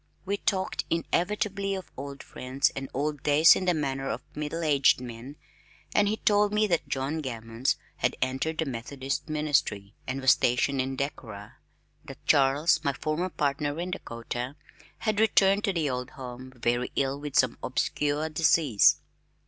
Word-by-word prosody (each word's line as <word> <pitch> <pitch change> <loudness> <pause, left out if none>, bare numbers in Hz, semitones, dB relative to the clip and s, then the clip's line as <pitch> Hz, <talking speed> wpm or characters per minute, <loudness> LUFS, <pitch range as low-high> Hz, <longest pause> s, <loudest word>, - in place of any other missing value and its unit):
We 200 +1 -1
talked 190 -2 -1
inevitably 195 +4 0
of 190 - -8
old 140 +1 -7
friends 130 +2 -1
and 135 0 -5
old 145 +1 -2
days 150 +3 +6
in 185 - -2
the 180 -1 +2
manner 135 -2 -2
of - - -4
middle 150 +3 -4
aged 140 -5 +4
men, 125 +3 -8 0.6
and 205 - +4
he 215 +2 0
told 205 -1 +3
me 210 +1 +3
that 175 -5 0
John 135 +4 -2
Gammons 115 -1 -2 0.2
had - - 0
entered 135 +5 -1
the 160 - 0
Methodist 135 +3 -4
ministry 145 -10 0
and 130 +1 -2
was 130 -1 +5
stationed 130 +2 +2
in 130 +1 -3
Decorah, 110 -7 -6 0.5
that - - -11
Charles, 145 +4 +3
my 140 -2 +1
former 155 +6 -2
partner 145 -1 -1
in 180 +1 -3
Dakota, 120 -4 -5 0.4
had 215 -2 -1
returned 200 -2 +4
to 195 - 0
the 165 -4 0
old 125 -2 -3
home 130 0 -8
very 120 +1 0
ill 135 0 0
with 145 -1 -6
some 130 -2 +3
obscure 145 +4 -1
disease. 155 -7 +4
145 Hz, 160 wpm, -27 LUFS, 130-165 Hz, 0.6 s, days